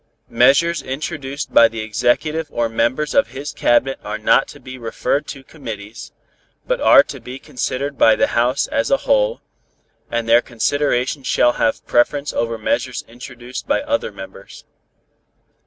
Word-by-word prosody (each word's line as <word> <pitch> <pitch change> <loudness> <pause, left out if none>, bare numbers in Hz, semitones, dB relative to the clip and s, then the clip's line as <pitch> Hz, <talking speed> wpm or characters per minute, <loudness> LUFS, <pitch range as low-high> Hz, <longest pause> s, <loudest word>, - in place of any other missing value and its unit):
Measures 140 +8 +3
introduced 140 +1 -5
by 115 - +7
the 115 -1 -6
Executive 135 +9 0
or 120 -1 -1
members 120 +6 -1
of 280 - +3
his 140 +3 -7
Cabinet 135 +3 +1
are - - -4
not - - +3
to - - -12
be 130 0 -10
referred 130 +4 -2
to 135 0 -8
committees, 110 -7 -9 0.5
but - - -1
are - - +7
to - - -9
be 125 +1 -9
considered 135 +2 -4
by 110 - +6
the - - +2
House 125 +3 +1
as 285 +3 0
a - - +3
whole, - - +1 0.7
and 115 -1 -2
their 115 +1 +5
consideration 130 +3 -1
shall 120 -1 +2
have 115 -2 -1
preference 140 +4 +1
over 115 0 -2
measures 125 +3 -2
introduced 125 +1 -9
by 285 - +1
other 285 - -1
members. 95 0 -12
130 Hz, 155 wpm, -19 LUFS, 115-145 Hz, 0.7 s, by